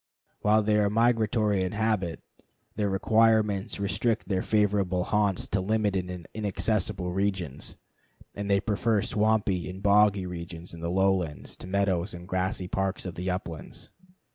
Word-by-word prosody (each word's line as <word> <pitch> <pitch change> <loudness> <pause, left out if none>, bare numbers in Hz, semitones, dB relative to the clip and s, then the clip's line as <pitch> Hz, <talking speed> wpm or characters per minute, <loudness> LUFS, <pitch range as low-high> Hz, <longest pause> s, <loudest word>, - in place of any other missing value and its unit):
While 105 +1 +3
they 105 0 +2
are 105 -1 +3
migratory 110 -3 +2
in 95 - -3
habit, 105 -6 -1 0.5
their 105 -1 0
requirements 110 0 +2
restrict 105 +3 0
their 95 -2 0
favorite 105 -3 +2
haunts 95 +2 +1
to 95 - -1
limited 100 -2 0
and 90 -2 -7
inaccessible 100 -3 -1
areas, 95 -7 -2 0.6
and 100 0 -5
they 100 0 +4
prefer 110 0 +1
swampy 105 -4 +1
and 95 +1 -8
boggy 100 -1 +4
regions 85 -1 -7
in 85 - -9
the 85 0 -3
lowlands 90 -6 0
to - - -9
the - - -9
meadows 100 -1 0
and 85 0 -10
grassy 95 +1 -1
parks 95 +1 -2
of 90 - -4
the 90 +2 -3
uplands. 85 -6 -6
100 Hz, 150 wpm, -27 LUFS, 90-105 Hz, 0.6 s, they